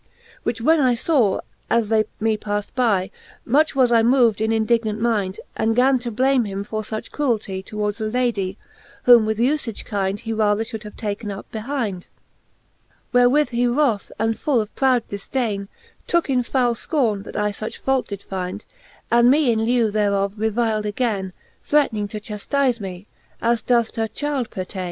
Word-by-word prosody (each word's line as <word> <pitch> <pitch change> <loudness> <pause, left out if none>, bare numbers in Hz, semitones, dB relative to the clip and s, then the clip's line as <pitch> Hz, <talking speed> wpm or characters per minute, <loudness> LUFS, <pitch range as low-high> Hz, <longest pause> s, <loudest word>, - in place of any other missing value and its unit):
XL 470 -1 -28
Which 230 0 -3
when 315 +6 +4
I 255 -4 +3
faw, 245 - +2 0.3
as 230 -2 +2
they 220 -1 +3
me 220 0 +1
palled 205 -1 -4
by, 210 -7 +1 0.3
Much 295 +5 +2
was 255 -3 +4
I 230 -1 +5
moved 235 -3 +3
in 220 0 +1
indignant 220 -1 +1
mind, 210 -5 0 0.2
And 225 0 +1
gan 260 +1 +4
to 240 0 -4
blame 255 +3 +2
him 200 -1 -4
for 215 +1 -4
luch 215 0 -6
cruelty 220 -9 -1
Towards 210 +2 -3
a - - -1
Ladie, 215 -5 -1 0.5
whom 235 -3 +7
with 220 -1 0
ufage 245 -2 0
kind 195 -1 -2
He 225 -1 -4
rather 215 0 +2
Ihould 220 -1 -7
have 210 - -9
taken 210 0 -4
up 200 0 -8
behind. 220 -5 -3 1.1
Wherewith 245 +5 +4
he 245 0 +1
wroth, 240 -5 +1
and 225 0 0
full 285 -6 +2
of 215 0 -4
proud 255 -3 +2
difdaine, 200 -1 -3 0.4
Tooke 340 -4 +1
in 255 -1 +3
foule 245 0 +1
fcorne, 230 -6 -1
that - - -8
I 210 0 +1
fuch 215 +2 -6
fault 265 -1 0
did 200 -1 -7
find, 190 +2 -5 0.5
And 235 +1 +5
me 280 -2 +4
in 220 -1 +1
lieu 235 -2 +2
thereof 200 -2 +1
revil'd 220 0 0
againe, 205 -4 -1 0.3
Threatning 235 -9 +1
to 215 - -5
chaftize, 235 +5 -1
me 190 -1 -7 0.3
as 235 -1 +1
doth 235 -1 +2
t'a 225 -1 -2
chyld 280 -1 -2
pertaine. 185 +1 -6
225 Hz, 175 wpm, -22 LUFS, 210-250 Hz, 1.1 s, whom